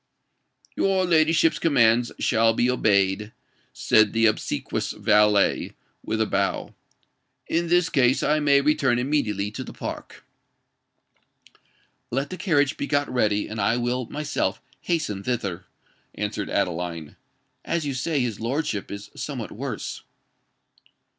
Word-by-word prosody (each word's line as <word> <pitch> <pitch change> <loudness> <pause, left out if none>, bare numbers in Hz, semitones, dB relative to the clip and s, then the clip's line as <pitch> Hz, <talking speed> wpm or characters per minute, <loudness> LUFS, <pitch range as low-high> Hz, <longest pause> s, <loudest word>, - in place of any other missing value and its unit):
"Your 190 -1 +2
ladyship's 165 -1 +3
commands 120 -6 +3
shall 115 0 +2
be 125 +2 +2
obeyed," 105 -2 +1 0.4
said 110 -2 +3
the 115 0 +3
obsequious 110 - -1
valet, 105 -1 +2 0.3
with 110 - -2
a 110 - +3
bow. 100 -2 -1 0.7
"In 170 +1 0
this 175 0 +3
case, 130 -5 +2
I 155 +1 +2
may 140 -2 +4
return 140 -4 +2
immediately 115 -7 -1
to - - -6
the - - -10
Park." - - -7 1.8
"Let 135 +3 -2
the 185 - -5
carriage 145 -8 +1
be 140 - -3
got 145 0 +1
ready, 105 -4 +1
and 110 +1 -4
I 115 - +2
will 120 0 -1
myself 150 0 -2 0.2
hasten 150 - -2
thither," 100 -6 -3 0.5
answered - - -3
Adeline; 85 -3 -2 0.5
"as 170 -2 -2
you 140 - -2
say 135 +6 -3
that 145 - +2
his 115 -4 -4
lordship 120 -2 -2
is 100 0 -8
somewhat - - -5
worse." - - -5
120 Hz, 130 wpm, -24 LUFS, 105-150 Hz, 1.8 s, may